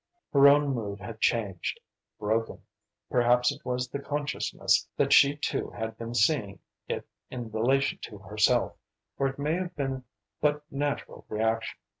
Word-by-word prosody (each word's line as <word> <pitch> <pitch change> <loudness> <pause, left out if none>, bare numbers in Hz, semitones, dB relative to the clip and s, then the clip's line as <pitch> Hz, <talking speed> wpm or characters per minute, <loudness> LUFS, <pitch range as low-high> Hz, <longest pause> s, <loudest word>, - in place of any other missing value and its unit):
Her 140 0 +8
own 145 0 +5
mood 105 -4 -4
had 110 +3 -8
changed, 100 -7 0 0.4
broken. 110 +2 -1 0.5
Perhaps 125 +1 +4
it 145 +1 -10
was 125 0 -1
the 140 - -5
consciousness 145 +1 0
that - - +3
she 140 +1 +7
too 150 - -2
had 110 -1 -5
been 115 +1 -6
seeing 110 -4 +2 0.3
it - - -3 0.2
in 120 -3 -6
relation 130 +5 +1
to 105 - -10
herself, 105 +1 +1 0.4
or 135 - +3
it 135 - -5
may 145 +2 0
have 180 0 -3
been 135 -2 -3 0.4
but 150 0 +2
natural 145 +1 -3
reaction. 110 +1 -1
125 Hz, 150 wpm, -28 LUFS, 110-140 Hz, 0.5 s, Her